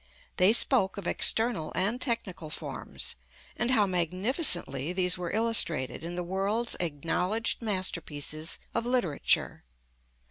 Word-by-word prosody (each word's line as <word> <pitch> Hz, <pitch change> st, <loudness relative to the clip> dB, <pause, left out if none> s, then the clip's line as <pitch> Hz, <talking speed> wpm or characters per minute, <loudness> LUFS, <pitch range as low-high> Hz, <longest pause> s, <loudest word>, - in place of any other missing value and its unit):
They 185 Hz, +3 st, +5 dB
spoke 225 Hz, -4 st, +4 dB
of 200 Hz, -, -7 dB
external 220 Hz, -4 st, +2 dB
and 215 Hz, +7 st, 0 dB
technical 190 Hz, -, -3 dB
forms, -, -, -5 dB, 0.4 s
and 240 Hz, -, -1 dB
how 225 Hz, -5 st, +4 dB
magnificently 180 Hz, -, +2 dB
these 180 Hz, -2 st, +1 dB
were 180 Hz, -1 st, -5 dB
illustrated 200 Hz, -, +1 dB
in 170 Hz, +1 st, -6 dB
the 180 Hz, -, -3 dB
world's 195 Hz, +6 st, -1 dB
acknowledged 180 Hz, -, -1 dB
masterpieces 165 Hz, -6 st, -2 dB, 0.2 s
of 235 Hz, -, -2 dB
literature. 245 Hz, -, 0 dB
185 Hz, 115 wpm, -28 LUFS, 170-225 Hz, 0.4 s, They